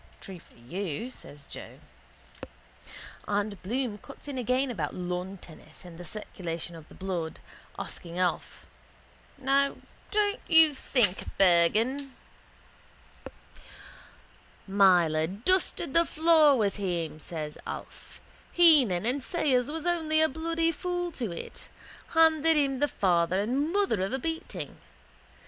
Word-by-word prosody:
—True 190 -2 -9
for - - -22
you, 175 - -5
says 145 - -11
Joe. - - -9 1.5
And 205 -1 -1
Bloom 230 +1 -2
cuts 275 +6 -13
in 275 -3 -4
again 255 +2 0
about 155 -10 -3
lawn 180 +2 -4
tennis 160 -1 -15
and 170 -1 -11
the 175 - -8
circulation 170 -3 -6
of 160 -2 -13
the - - -14
blood, 180 -4 -4 0.4
asking 170 0 -7
Alf: 180 -1 -2 0.7
—Now, 275 +1 +2 0.3
don't 420 +1 +1
you 320 -2 +6
think, 235 -8 +1
Bergan? 215 +10 +3 2.5
—Myler 175 -5 +4
dusted 275 - 0
the 335 - +5
floor 315 -4 +5
with 205 -3 0
him, 170 -6 -3
says 155 -2 -6
Alf. - - -9 0.3
Heenan 275 - +5
and 260 +4 0
Sayers 260 -4 +1
was 320 +1 -5
only 320 -3 +1
a 315 - +5
bloody 330 +2 -1
fool 355 +1 -3
to 240 - -4
it. 170 - -8 0.5
Handed 320 -1 +5
him 275 -3 +1
the 290 - +3
father 180 -6 +1
and 265 +9 0
mother 390 - +1
of 195 +6 -3
a - - +1
beating. 325 +4 -5
235 Hz, 125 wpm, -28 LUFS, -, 2.5 s, you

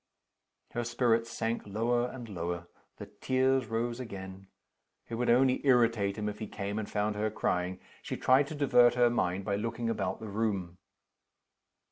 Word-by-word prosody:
Her 120 - -2
spirits 115 -1 +1
sank 115 +1 -2
lower 120 +4 +1
and 125 -2 -8
lower. 85 -3 -4 0.3
The - - -7
tears 130 -1 +1
rose 115 +2 -2
again. 95 -5 -8 0.6
It - - -8
would 120 +2 0
only 130 +2 +4
irritate 115 -7 +3
him 105 0 -2
if 105 0 -4
he 110 - -4
came 100 +1 -4
and 105 - -5
found 105 0 -1
her 105 +1 0
crying. 90 -3 -1 0.2
She - - -5
tried 135 +2 +4
to 155 - -6
divert 125 -4 +5
her 120 -1 +4
mind 95 -4 0
by 100 -1 0
looking 115 +2 -2
about - - -2
the 110 - -7
room. 100 -4 -2
115 Hz, 165 wpm, -30 LUFS, 100-120 Hz, 0.6 s, divert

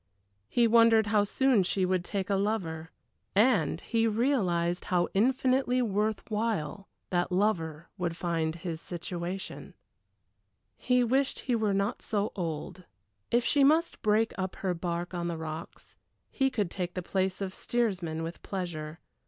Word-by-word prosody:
He 240 - +3
wondered 230 -1 +6
how 210 -1 +3
soon 260 0 +3
she 185 +1 +1
would 185 -1 +1
take 195 +1 -3
a - - +3
lover 185 -6 -1 0.5
and 205 - +3
he 230 -1 +1
realized 195 -8 +1
how 175 -1 +1
infinitely 255 +3 +2
worth 210 0 0
while 205 -5 -2 0.2
that 175 0 +1
lover 170 -5 0
would 170 -2 -2
find 165 -3 -1
his 170 -1 -5
situation. 175 +2 -6 1.0
He 250 -1 +2
wished 265 +3 +1
he 250 - 0
were 215 -3 +1
not 200 +4 -1
so 210 -1 -1
old. 175 +1 -4 0.4
If 240 0 +2
she 285 -1 +4
must 315 +5 +3
break 215 +1 +2
up 190 -1 -2
her 185 -2 -1
bark 175 +1 -3
on 170 -1 -2
the 170 -1 -3
rocks, 160 +1 -7 0.4
he 270 -1 +2
could 205 -8 -1
take 180 -2 -3
the 180 - -3
place 190 +1 -1
of 195 -2 -3
steersman 185 -11 -1
with 165 +1 -6
pleasure. 165 -5 -5
190 Hz, 150 wpm, -29 LUFS, 170-225 Hz, 1.0 s, wondered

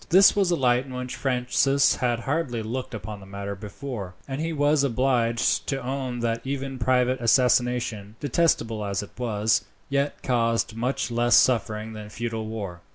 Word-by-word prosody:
This 190 +3 +7
was 195 -3 +2
a 175 - +3
light 125 -2 +2
in 130 - -7
which 125 0 -4
Francis 135 +2 +2
had 120 -2 0
hardly 135 -5 -1
looked 120 +2 -4
upon 105 0 -7
the 95 - -13
matter 100 +1 -5
before, 100 -1 -7
and 135 +2 -4
he 165 +1 -1
was 145 -1 +2
obliged 120 -3 +1
to 135 - -1
own 130 -1 -3
that 115 -1 -1
even 135 -1 -4
private 125 +1 +2
assassination, 120 -4 +2
detestable 125 -7 +1
as 100 0 -2
it 105 - -11
was, 110 -2 +1 0.3
yet 140 +1 -1
caused 115 -3 +1
much 125 +2 -1
less 120 0 +3
suffering 110 -2 +2
than 105 -1 -8
feudal 115 0 -4
war. 100 -6 -6
120 Hz, 165 wpm, -25 LUFS, 110-135 Hz, 0.3 s, This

